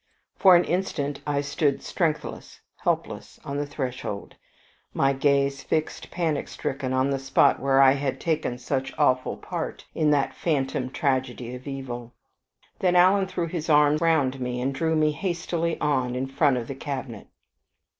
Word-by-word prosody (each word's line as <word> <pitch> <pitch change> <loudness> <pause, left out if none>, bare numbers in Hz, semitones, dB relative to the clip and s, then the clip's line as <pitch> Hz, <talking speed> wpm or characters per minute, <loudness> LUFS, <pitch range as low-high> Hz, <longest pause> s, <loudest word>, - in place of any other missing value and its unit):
For 185 -2 +7
an 175 - +5
instant 165 -6 -2
I 145 -1 +1
stood 140 0 0
strengthless, 160 -4 -3 0.2
helpless, - - -3
on 140 0 -3
the 145 0 -2
threshold, 125 -7 -5 0.6
my 135 0 +3
gaze 140 0 +1
fixed 155 -1 -2
panic 165 -4 -1
stricken 135 -1 -4
on 130 +1 +1
the 135 - 0
spot 135 0 +3
where 135 0 +2
I 135 -1 +8
had 135 -1 -1
taken 155 -7 -1
such 130 +2 -3
awful 130 -4 +2
part - - -5
in 155 -2 +2
that 145 -2 +2
phantom 135 -5 -1
tragedy 130 -3 -1
of 125 +2 -9
evil; 125 -3 -6 0.7
then 180 -1 +2
Alan 190 +2 +5
threw 175 -2 -2
his 165 -1 -4
arm 150 0 +5
round 155 -5 +2
me, 125 0 -2
and 135 +2 -1
drew 160 +3 0
me 155 -1 +3
hastily 170 0 -2
on 130 -4 0
in 130 +1 -1
front 135 0 +2
of 120 -2 -4
the - - -4
cabinet. 135 -3 -6
140 Hz, 160 wpm, -25 LUFS, 130-155 Hz, 0.7 s, I